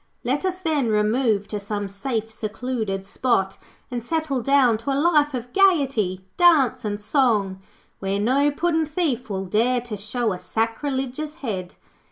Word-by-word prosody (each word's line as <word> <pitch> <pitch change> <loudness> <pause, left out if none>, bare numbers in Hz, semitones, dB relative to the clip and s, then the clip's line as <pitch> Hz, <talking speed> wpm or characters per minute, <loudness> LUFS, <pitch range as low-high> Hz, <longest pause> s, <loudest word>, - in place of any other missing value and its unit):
Let 270 +8 -1
us, 370 -1 -1
then, 310 -8 0
remove 215 0 +1
to 210 - -3
some 205 0 -3
safe, 225 +2 -3
secluded 220 -2 -3
spot 195 -3 0 0.3
and 240 -2 -3
settle 310 -2 -1
down 255 -4 +3
to 230 - -5
a 270 - +1
life 295 -3 +3
of 245 0 -6
gaiety, 270 - +2
dance, 285 -8 +4
and 205 -1 -2
song, 210 -6 +1 0.4
where 195 +1 -1
no 265 +7 +3
puddin' 320 +1 0
thief 295 -7 -1
will 195 -1 -3
dare 235 +6 +2
to 235 -3 -6
show 215 +2 -1
a 180 - -6
sacrilegious 265 +7 -2
head. 185 -6 -4
245 Hz, 155 wpm, -23 LUFS, 210-280 Hz, 0.4 s, dance